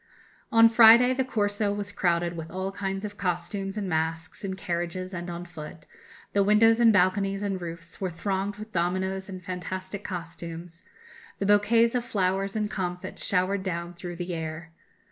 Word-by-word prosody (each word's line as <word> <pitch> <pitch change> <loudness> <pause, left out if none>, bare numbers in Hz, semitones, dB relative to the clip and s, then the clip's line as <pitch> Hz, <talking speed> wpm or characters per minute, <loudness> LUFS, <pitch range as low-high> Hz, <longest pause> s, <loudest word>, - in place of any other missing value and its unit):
"On 225 0 +8
Friday... 230 +2 +8
the 265 +1 +1
Corso 205 -4 0
was 205 0 -3
crowded 175 -3 0
with 165 -1 -6
all 190 +2 -3
kinds 195 0 -3
of 205 -1 -7
costumes 195 +2 -2
and 205 -2 -2
masks 160 +1 -2
in 190 -1 -3
carriages 180 +1 -3
and 175 0 -5
on 175 0 -5
foot; 155 -2 -10 0.5
the 200 - +3
windows 220 +3 +5
and 230 -1 +7
balconies 195 +1 +2
and 195 -2 -2
roofs 170 0 -8
were 190 - 0
thronged 195 +3 -2
with 215 +2 -10
dominoes 190 +2 -1
and 185 -1 -7
fantastic 185 +2 -5
costumes; 170 -1 -7 0.6
bouquets 205 +3 +4
of 250 -1 0
flowers 195 -2 0
and 210 -1 -1
comfits 180 -2 -4
showered 190 +1 +1
down 175 -2 -4
through 175 0 -7
the 175 +1 -4
air.... 160 0 -5
190 Hz, 165 wpm, -27 LUFS, 175-205 Hz, 0.6 s, On